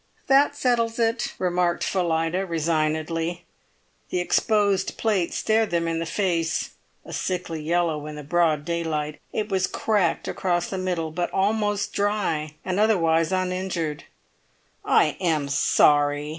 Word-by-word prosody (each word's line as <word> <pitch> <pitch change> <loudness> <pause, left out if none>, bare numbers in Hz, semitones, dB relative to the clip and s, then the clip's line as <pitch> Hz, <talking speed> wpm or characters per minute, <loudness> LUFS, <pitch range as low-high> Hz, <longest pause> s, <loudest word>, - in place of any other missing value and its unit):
"That 280 +1 +4
settles 235 -4 +1
it," 230 0 0
remarked 175 -1 0
Phillida, 170 0 0
resignedly. 165 +1 -1 0.6
The 180 - -1
exposed 200 +1 +1
plate 200 -6 0
stared 220 0 +1
them 170 -1 0
in 165 0 -1
the 165 - -3
face, 170 -4 -1 0.3
a - - -9
sickly 180 -3 -3
yellow 160 -2 0
in 150 - -7
the 150 - -7
broad 155 -1 +1
daylight. 155 -3 -2
It 215 0 -2
was 190 -2 +1
cracked 205 -6 0
across 175 -2 -1
the 190 - -2
middle, 175 -4 -2
but 175 +2 -2
almost 205 0 0
dry 190 -7 -1
and 185 +1 -1
otherwise 165 -6 +3
uninjured. 185 -4 -2 0.8
"I - - +3
am 160 -6 0
sorry!" 145 +1 +3
175 Hz, 130 wpm, -24 LUFS, 160-195 Hz, 0.8 s, That